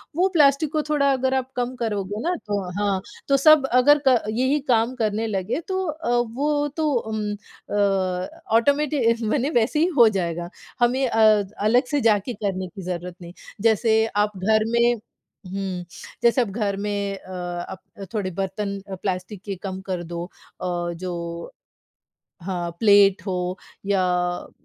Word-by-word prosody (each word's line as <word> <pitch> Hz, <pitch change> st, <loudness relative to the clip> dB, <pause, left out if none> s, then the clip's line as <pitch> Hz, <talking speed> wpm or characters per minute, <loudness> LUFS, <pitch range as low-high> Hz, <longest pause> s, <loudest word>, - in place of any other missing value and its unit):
वो 365 Hz, +3 st, +3 dB
प्लास्टिक 290 Hz, -1 st, +4 dB
को 305 Hz, -, +2 dB
थोड़ा 280 Hz, -2 st, +3 dB
अगर 260 Hz, 0 st, +1 dB
आप 260 Hz, 0 st, -1 dB
कम 250 Hz, +1 st, -2 dB
करोगे 210 Hz, -3 st, -3 dB
ना 355 Hz, +4 st, 0 dB
तो 205 Hz, -1 st, -1 dB, 0.2 s
हाँ, 200 Hz, -2 st, 0 dB, 0.3 s
तो 275 Hz, 0 st, +4 dB
सब 310 Hz, 0 st, +6 dB
अगर 280 Hz, +4 st, +5 dB
क 250 Hz, -3 st, +5 dB
यही 260 Hz, +6 st, +1 dB
काम 235 Hz, +1 st, +2 dB
करने 220 Hz, -1 st, -1 dB
लगे 200 Hz, -, -2 dB
तो 380 Hz, -1 st, -1 dB
अ, 310 Hz, -3 st, -4 dB, 0.2 s
वो 290 Hz, +3 st, 0 dB
तो 310 Hz, -1 st, +1 dB
उम, 220 Hz, -3 st, -2 dB
अ, 195 Hz, -3 st, -2 dB, 0.3 s
ऑटोमेटि 280 Hz, -1 st, +3 dB, 0.2 s
मने 275 Hz, +2 st, +1 dB
वैसे 245 Hz, +2 st, +1 dB
ही 330 Hz, -, +4 dB
हो 235 Hz, -3 st, +8 dB
जाएगा, 175 Hz, -3 st, -2 dB, 0.3 s
हमें 250 Hz, +3 st, +2 dB
अ, 215 Hz, -2 st, +4 dB, 0.2 s
अलग 225 Hz, +5 st, +3 dB
से 290 Hz, -, +1 dB
जाके 215 Hz, +1 st, +2 dB
करने 195 Hz, -3 st, -3 dB
की 195 Hz, +1 st, -10 dB
ज़रूरत 180 Hz, 0 st, -5 dB
नहीं। 170 Hz, 0 st, -10 dB, 0.3 s
जैसे 220 Hz, 0 st, +3 dB
आप 210 Hz, 0 st, +2 dB
घर 215 Hz, +3 st, +2 dB
में 235 Hz, 0 st, +3 dB
हुँ, 195 Hz, -4 st, -8 dB, 0.4 s
जैसे 235 Hz, +2 st, +4 dB
अब 230 Hz, -, -1 dB
घर 205 Hz, -2 st, -1 dB
में 200 Hz, -1 st, -2 dB
अ, 185 Hz, -, -13 dB, 0.4 s
अप 190 Hz, -, -7 dB, 0.3 s
थोड़े 195 Hz, -3 st, -2 dB
बर्तन 200 Hz, +2 st, -3 dB
अ, 190 Hz, -, -4 dB
प्लास्टिक 185 Hz, +2 st, -4 dB
के 200 Hz, -, -3 dB
कम 190 Hz, -1 st, -4 dB
कर 180 Hz, -2 st, -2 dB
दो 170 Hz, 0 st, -5 dB, 0.4 s
अ, 175 Hz, -1 st, -2 dB
जो 170 Hz, -1 st, -6 dB, 0.9 s
हाँ, 175 Hz, -1 st, -3 dB
प्लेट 200 Hz, -3 st, +5 dB
हो 180 Hz, 0 st, -2 dB, 0.3 s
या 195 Hz, -2 st, +2 dB
अ, 180 Hz, 0 st, -1 dB
210 Hz, 160 wpm, -23 LUFS, 190-250 Hz, 0.9 s, हो